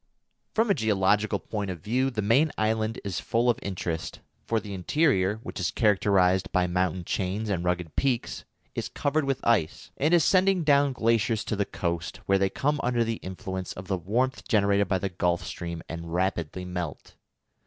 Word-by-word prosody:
_] - - -43
From 225 -1 +3
a - - +6
geological 105 - +2
point 105 -3 -4
of 90 -2 -5
view 125 +7 +1
the 110 -5 -3
main 135 +9 +3
island 110 +1 0
is 100 -3 -3
full 120 +2 +2
of 115 - -5
interest, 85 -5 -4 0.3
for 115 - +1
the 105 -2 -8
interior, 100 - +2
which - - -6
is 90 -2 0
characterised 95 -3 +2
by 90 -1 +2
mountain 90 0 -1
chains 100 +5 -2
and 90 -3 -1
rugged 90 -2 -2
peaks, 130 -4 -1 0.3
is - - -3
covered 145 +1 0
with 135 -1 -2
ice, 105 -10 +1
and 155 +5 +3
is 165 - +4
sending 190 -1 +3
down 140 -2 +4
glaciers 115 -2 +1
to 110 - -2
the 100 0 0
coast, 85 -2 -3
where 95 0 +3
they 95 0 +2
come 145 +6 0
under 120 -1 +1
the 115 0 -2
influence 95 0 -5
of 90 +1 -9
the 95 - 0
warmth 120 - -1
generated 100 -3 +3
by 95 - +1
the 95 +1 -2
Gulf 85 -1 0
Stream 85 -1 -6
and 85 0 -6
rapidly 90 -1 -1
melt. 90 -4 -5
100 Hz, 185 wpm, -27 LUFS, 90-120 Hz, 0.3 s, a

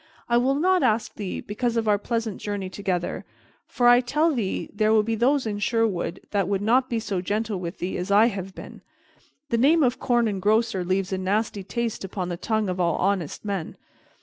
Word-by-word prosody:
I 235 - +3
will 260 +3 +2
not 365 +5 +3
ask 225 -4 +1
thee, 200 -4 -5
because 235 +3 -2
of 225 -1 0
our 205 -1 +3
pleasant 225 -1 -3
journey 200 -3 -4
together; 185 -3 -2 0.4
for 245 - +1
I 245 0 +7
tell 300 +6 +1
thee 220 -8 -2
there 215 +1 +2
be 225 +1 -1
those 255 +5 +2
in 205 -2 -3
Sherwood 205 -6 0
that 200 -3 +1
would 200 0 -1
not 250 +4 +3
be 235 - 0
so 205 -5 -3
gentle 210 +1 -2
with 170 -1 -6
thee 180 - -3
as 180 +2 -4
I 205 +3 +6
have 195 -4 -3
been. - - -10 0.7
The 235 - +1
name 305 +5 +5
of 250 -2 +1
Corn 240 -1 +2
Engrosser 210 0 +1
leaves 185 +1 -1
a 190 - -1
nasty 200 +1 -1
taste 235 +2 -3
upon 185 -1 -4
the 175 - -2
tongue 215 +2 -1
of 185 0 -3
all 170 -2 +2
honest 190 -2 -1
men. 195 -5 -4
210 Hz, 200 wpm, -25 LUFS, 190-235 Hz, 0.7 s, I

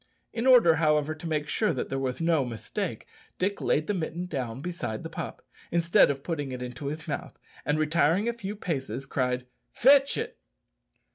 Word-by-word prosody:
In 235 +2 -1
order, 230 - +7
however, 150 -1 +2
to 155 +2 -7
make 150 -1 -1
sure 210 +2 +1
that 125 - -3
there 135 - -1
was 130 -2 -2
no 165 -3 +3
mistake, 120 -3 -4 0.3
Dick 200 +2 -1
laid 150 - +2
the 205 - 0
mitten 175 -1 -3
down 130 -8 -4
beside 145 -9 -4
the - - -6
pup, - - -6 0.2
instead 170 0 +4
of 140 -1 -2
putting 145 -6 -3
it 125 - -4
into 125 +3 -6
his 155 +2 -5
mouth, 145 - -4 0.3
and, 150 - +1
retiring 165 +6 +2
a 235 - +1
few 210 -3 -5
paces, 135 -8 -3
cried, 125 -2 -1 0.3
"Fetch 275 +2 +5
it." - - -4
155 Hz, 185 wpm, -28 LUFS, 135-180 Hz, 0.3 s, order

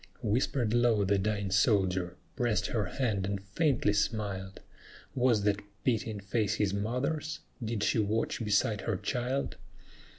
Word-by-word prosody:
Whispered 115 +1 +1
low 120 -4 +3
the 100 +1 +2
dying 100 -1 -1
soldier, 95 -3 +2 0.2
pressed 115 -5 +1
her 110 -1 0
hand 105 -8 -1
and 100 0 -2
faintly 105 - +1
smiled; 100 -3 -2 0.5
Was 120 -5 +3
that 105 0 +1 0.2
pitying 110 -4 0
face 105 +1 0
his 100 -2 0
mother's? 130 +9 -2 0.2
did 110 -2 -2
she - - +2
watch 110 +2 0
beside 105 0 +2
her 105 -1 -1
child? 125 +7 -2
105 Hz, 135 wpm, -30 LUFS, 100-120 Hz, 0.5 s, low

